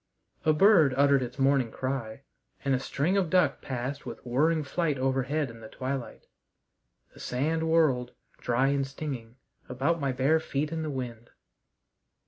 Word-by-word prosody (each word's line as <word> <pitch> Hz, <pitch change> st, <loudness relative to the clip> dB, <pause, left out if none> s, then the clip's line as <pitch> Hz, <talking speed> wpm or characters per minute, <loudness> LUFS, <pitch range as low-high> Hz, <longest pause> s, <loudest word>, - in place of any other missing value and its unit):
A 155 Hz, -, +5 dB
bird 155 Hz, -5 st, +5 dB
uttered 140 Hz, -1 st, +4 dB
its 125 Hz, 0 st, -5 dB
morning 135 Hz, -3 st, +3 dB
cry, 130 Hz, -1 st, -4 dB, 0.4 s
and 135 Hz, -, +2 dB
a 130 Hz, -, +2 dB
string 150 Hz, +8 st, 0 dB
of 185 Hz, -4 st, +1 dB
duck 180 Hz, +1 st, +2 dB
passed 130 Hz, +1 st, -4 dB
with -, -, -7 dB
whirring 155 Hz, +6 st, +2 dB
flight 150 Hz, 0 st, -1 dB
overhead 135 Hz, +2 st, 0 dB
in 115 Hz, -, -13 dB
the 110 Hz, -, -10 dB
twilight. 130 Hz, +1 st, -5 dB, 0.9 s
The -, -, -16 dB
sand 160 Hz, +6 st, -1 dB
whirled, 135 Hz, -7 st, +2 dB, 0.3 s
dry 125 Hz, +3 st, +1 dB
and 140 Hz, -1 st, 0 dB
stinging, 135 Hz, -5 st, -6 dB, 0.3 s
about 140 Hz, +7 st, 0 dB
my 140 Hz, -1 st, 0 dB
bare 135 Hz, +5 st, +2 dB
feet 150 Hz, -1 st, -2 dB
in 165 Hz, -1 st, -2 dB
the 155 Hz, -, -3 dB
wind. 120 Hz, -4 st, -6 dB
135 Hz, 155 wpm, -28 LUFS, 125-155 Hz, 0.9 s, A